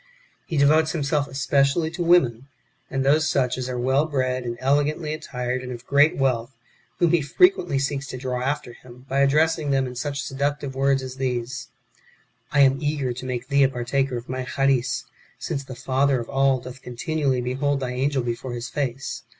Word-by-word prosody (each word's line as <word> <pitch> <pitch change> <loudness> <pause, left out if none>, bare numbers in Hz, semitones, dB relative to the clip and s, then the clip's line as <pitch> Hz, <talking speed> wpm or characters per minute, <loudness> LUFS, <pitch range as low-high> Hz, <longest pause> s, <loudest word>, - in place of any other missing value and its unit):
He 165 - -2
devotes 155 +3 +4
himself 145 -2 0
especially 140 +4 +1
to 175 - -5
women, 135 -8 +3 0.4
and 135 0 -1
those 155 +3 +3
such 125 -2 +1
as 130 0 -4
are 125 - -3
well 130 +5 +2
bred, 130 -3 -1
and 120 0 -4
elegantly 145 +4 +1
attired, 125 -4 -3
and 125 0 -7
of 120 0 -8
great 145 +4 +4
wealth, 130 -2 0 0.4
whom 170 -2 +3
he 170 -2 +3
frequently 175 - +3
seeks 140 0 -2
to 130 - -6
draw 125 -1 -3
after 135 -1 -2
him, 125 +1 -15
by 135 +1 0
addressing 150 +2 +3
them 135 -1 +2
in 125 - -6
such 140 +3 -3
seductive 140 0 -2
words 135 0 +1
as 130 0 -7
these: 125 -1 -3 0.4
" - - -37
I 145 - +4
am 135 0 +4
eager 145 -4 -1
to 125 +2 -8
make 125 0 -4
thee 140 0 +3
a 135 - +5
partaker 130 +1 -1
of 120 - -8
my 130 0 -3
Charis, 135 -1 0 0.3
since 140 - -4
the 130 -1 -9
Father 130 +1 +1
of 115 - -6
all 135 -1 +3
doth 130 +1 -10
continually 135 +1 -1
behold 135 +3 0
thy 130 -2 -3
angel 130 +1 0
before 120 +1 -4
His 120 0 -5
face. 135 -2 -3
135 Hz, 190 wpm, -24 LUFS, 125-145 Hz, 0.4 s, a